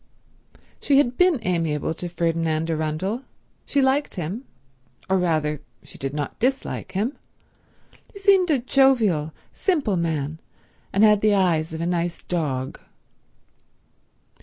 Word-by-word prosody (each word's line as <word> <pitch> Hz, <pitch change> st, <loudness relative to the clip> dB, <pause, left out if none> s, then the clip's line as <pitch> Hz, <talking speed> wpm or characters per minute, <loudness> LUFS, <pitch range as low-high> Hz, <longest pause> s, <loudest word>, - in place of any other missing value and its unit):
She 280 Hz, -, +3 dB
had 255 Hz, -3 st, +3 dB
been 360 Hz, -1 st, +4 dB
amiable 165 Hz, -4 st, 0 dB
to 175 Hz, +2 st, -5 dB
Ferdinand 165 Hz, -1 st, 0 dB
Arundel; 160 Hz, +9 st, -2 dB, 0.5 s
she 280 Hz, -1 st, +2 dB
liked 270 Hz, +2 st, +1 dB
him—or 155 Hz, -, -6 dB
rather 155 Hz, -4 st, 0 dB, 0.2 s
she -, -, -14 dB
did 135 Hz, 0 st, -3 dB
not 145 Hz, -1 st, -4 dB
dislike 265 Hz, +3 st, -1 dB
him. 215 Hz, +9 st, -2 dB, 0.9 s
He -, -, -12 dB
seemed 390 Hz, -3 st, +4 dB
a 300 Hz, -, +4 dB
jovial, 235 Hz, -, +3 dB, 0.2 s
simple 285 Hz, -, 0 dB
man, 160 Hz, -2 st, -2 dB, 0.5 s
and 200 Hz, -, +3 dB
had 210 Hz, -1 st, +6 dB
the 215 Hz, -1 st, +4 dB
eyes 165 Hz, -5 st, +2 dB
of 160 Hz, 0 st, -5 dB
a -, -, -1 dB
nice 175 Hz, -1 st, -2 dB
dog. 140 Hz, -7 st, -2 dB
175 Hz, 125 wpm, -23 LUFS, 155-250 Hz, 0.9 s, had